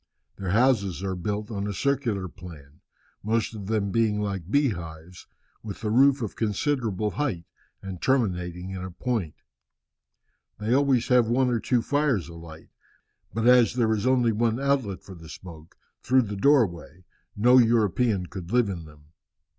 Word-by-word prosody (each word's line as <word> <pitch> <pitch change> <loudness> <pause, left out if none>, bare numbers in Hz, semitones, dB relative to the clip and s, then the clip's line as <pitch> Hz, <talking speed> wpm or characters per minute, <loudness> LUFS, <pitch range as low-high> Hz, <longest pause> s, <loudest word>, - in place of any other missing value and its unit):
Their 95 -2 -4
houses 100 -4 +2
are 95 -1 -2
built 105 +4 -4
on 100 -1 -3
a 100 - -3
circular 120 -9 -1
plan, 75 -6 -13 0.4
most 115 +2 -1
of 100 -3 -8
them 105 -2 -1
being 110 -2 +1
like 100 -4 -4
bee 140 +3 +3
hives, 85 -2 -9 0.3
with 105 -3 -8
the 105 -2 -2
roof 135 +2 +4
of 110 - -5
considerable 110 -2 -1
height, 105 - -3 0.4
and 95 -3 -7
terminating 90 -8 -1
in 95 -1 -5
a 95 - -5
point. 100 - -3 1.2
They 110 +3 -1
always 135 -3 +2
have 125 -3 +4
one 125 +1 +2
or 120 - +1
two 120 0 0
fires 140 - 0
alight, 85 -1 -12 0.6
but 115 +1 -2
as 125 -1 +5
there 115 -3 +2
is 110 +3 -1
only 125 -3 +3
one 115 +2 0
outlet 135 -8 -1
for 95 - -11
the 80 -2 -13
smoke, 85 -3 -12 0.2
through 130 +1 +3
the 105 -2 -5
doorway, 95 - +1 0.3
no 125 +5 +5
European 110 -3 +2
could 90 -1 -8
live 120 -3 +3
in 85 -4 -6
them. 75 0 -18
105 Hz, 160 wpm, -26 LUFS, 90-125 Hz, 1.2 s, as